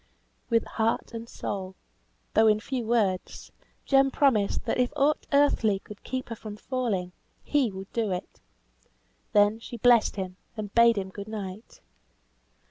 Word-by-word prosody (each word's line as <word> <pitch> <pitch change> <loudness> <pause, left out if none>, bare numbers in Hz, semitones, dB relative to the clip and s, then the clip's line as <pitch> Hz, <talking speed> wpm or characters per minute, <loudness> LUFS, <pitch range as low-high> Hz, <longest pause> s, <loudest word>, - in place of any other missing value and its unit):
With 230 -1 +3
heart 225 +1 -1
and 230 0 -7
soul, 190 -1 -5 0.6
though 220 0 +5
in 215 -1 +4
few 245 0 -4
words, 205 -6 -1 0.3
Jem 270 0 +4
promised 250 -7 +2
that - - -1
if 250 -1 +2
aught 295 +1 +1
earthly 280 -8 +3
could 205 +1 -13
keep 255 0 -4
her 230 - -4
from 210 -1 -8
falling, 215 -8 -2 0.3
he 285 -5 +2
would 190 0 -9
do 225 -4 0
it. 180 0 -5 0.9
Then 205 +1 +4
she 235 +1 -8
blessed 240 0 +4
him, 185 -2 -5 0.2
and 205 -2 -5
bade 235 -1 +6
him 190 -1 -2
good 200 +2 -8
night. 210 -1 -7
220 Hz, 150 wpm, -27 LUFS, 200-245 Hz, 0.9 s, bade